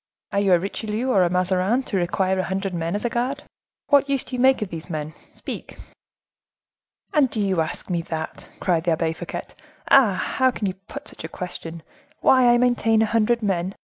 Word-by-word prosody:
"Are 200 - +1
you 195 -2 +3
a 175 - +5
Richelieu 215 +6 -3
or 195 - +4
a 175 - +3
Mazarin, 185 +7 +1
to 215 - -5
require 190 +1 +1
a 185 - 0
hundred 195 0 -2
men 170 +2 -2
as 205 - -3
a - - +2
guard? 260 +4 -2 0.5
What 285 -1 +4
use 275 -2 +1
do 255 - -6
you 245 - -1
make 260 -3 +4
of 205 - -6
these 165 +1 -7
men?—speak." 155 -1 -7 1.4
"And 290 -4 +4
do 220 - -3
you 190 -4 +1
ask 160 - -3
me 175 -3 -1
that?" 160 -1 -6
cried 170 -2 0
the 170 - +3
Abbe 160 0 0
Fouquet; - - -6 0.5
"ah! 250 -8 +7
how 260 +7 +1
can 230 -4 -3
you 190 - -1
put 205 +10 -11
such - - -11
a - - -4
question,—why 185 - 0
I 240 - +5
maintain 240 -3 +3
a 220 - -2
hundred 230 +1 +2
men? 190 -1 -1
195 Hz, 200 wpm, -23 LUFS, 175-240 Hz, 1.4 s, ah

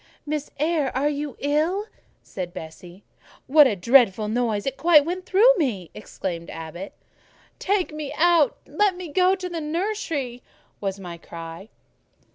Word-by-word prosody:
"Miss 300 -1 -3
Eyre, 305 -2 +1
are 285 +3 +2
you 290 -1 -4
ill?" 315 +8 +1 0.4
said 180 -1 -7
Bessie. 175 +3 -10 0.4
"What 295 +1 +7
a 215 - 0
dreadful 215 0 +4
noise! 220 -3 0
it 270 +2 -4
went 320 -4 +7
quite 365 +2 -4
through 460 +7 +6
me!" 220 - -2
exclaimed 175 -5 -6
Abbot. 165 +4 -7 0.7
"Take 380 -4 0
me 305 -2 -5
out! 335 -3 +4
Let 410 -3 +1
me 360 -2 -7
go 365 +5 +3
into 375 -1 -3
the 340 -2 -4
nursery!" 310 - -3 0.4
was 195 -1 -3
my 175 -3 -8
cry. 165 +4 -9
285 Hz, 145 wpm, -24 LUFS, -, 0.7 s, What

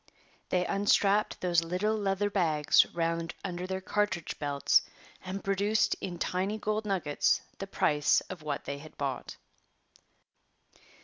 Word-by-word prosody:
They 180 0 +1
unstrapped 205 +1 +2
those 175 -2 +2
little 185 +6 0
leather 205 -1 0
bags 155 -6 +4
round 165 0 -2
under 180 -1 -4
their 190 0 -3
cartridge 200 -4 -1
belts 145 -1 +3 0.4
and 190 +1 -5
produced 200 +2 +2
in 180 -2 -4
tiny 190 +5 -1
gold 215 0 -2
nuggets 180 -8 +1 0.2
the 195 - -4
price 150 -6 +2
of 185 -4 -9
what 150 -1 -4
they 140 0 -4
had 155 +2 -13
bought. 135 -3 -4
185 Hz, 130 wpm, -30 LUFS, 165-200 Hz, 0.4 s, bags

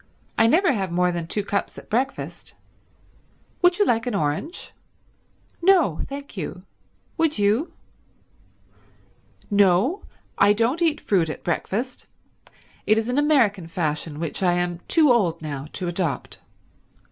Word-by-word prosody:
I 225 - +4
never 335 - +4
have 190 -6 -2
more 180 +1 +2
than 170 -1 -4
two 205 +4 -2
cups 200 -1 -2
at - - -11
breakfast. 255 +5 -3 1.1
Would 355 0 +4
you 410 - +3
like 230 -3 +1
an 240 - -1
orange?" 155 - -3 0.9
"No 340 - +4
thank 280 +1 -8
you. - - -6 0.6
Would 325 -2 +2
you?" 210 +10 +1 1.8
"No, 205 - +3 0.4
I 200 +1 +6
don't 235 +10 0
eat 320 -3 +1
fruit 175 -6 +1
at - - -7
breakfast. 220 +8 -3 0.8
It 215 - +4
is 225 +2 -1
an 250 +3 +1
American 235 - +2
fashion 155 -2 -3
which 165 +4 -3
I 180 -2 +3
am 175 -1 -1
too 310 -5 +4
old 175 -8 +1
now 145 -2 -5
to 185 - -4
adopt. 170 -6 -3
205 Hz, 135 wpm, -23 LUFS, 175-275 Hz, 1.8 s, I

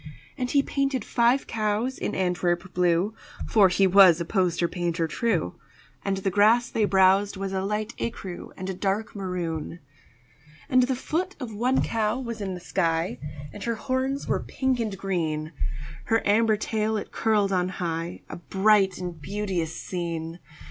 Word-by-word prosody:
And 250 -1 -2
he 280 +1 +3
painted 275 -5 -1
five 240 +3 +2
cows 220 +4 -1
in - - -2
Antwerp 180 0 0
blue 180 +3 +2 0.3
(For 205 -4 +5
he 185 +2 +3
was 185 -3 +7
a 170 - -2
poster 175 -3 +1
painter 170 -1 -1
true), 180 - -1 0.4
And 195 -1 0
the 195 0 -1
grass 225 +5 +4
they 220 - +2
browsed 195 +1 +4
was 195 0 -3
a 190 - 0
light 210 +3 -2
écru 190 -6 -5
And 185 - -5
a 190 - -2
dark 200 +4 -2
maroon. 175 -4 -3 0.9
And 255 - +4
the 255 +1 +1
foot 345 +9 -2
of 245 -5 -6
one 245 +5 +1
cow 225 +1 0
was 235 -4 -5
in 190 -2 -3
the - - -7
sky, 165 -6 -1 0.3
And 205 - -8
her 235 -1 0
horns 265 +3 -2
were - - +1
pink 265 -2 -1
and 215 -4 -2
green; 160 -5 -2 0.5
Her 225 -2 +1
amber 215 +1 +4
tail 220 0 -1
it - - -6
curled 210 -3 +1
on 180 0 +1
high 170 -2 -4
A - - -7
bright 195 +1 +3
and 175 -3 -6
beauteous 185 -2 -2
scene. 170 -2 -4
195 Hz, 165 wpm, -26 LUFS, 180-225 Hz, 0.9 s, was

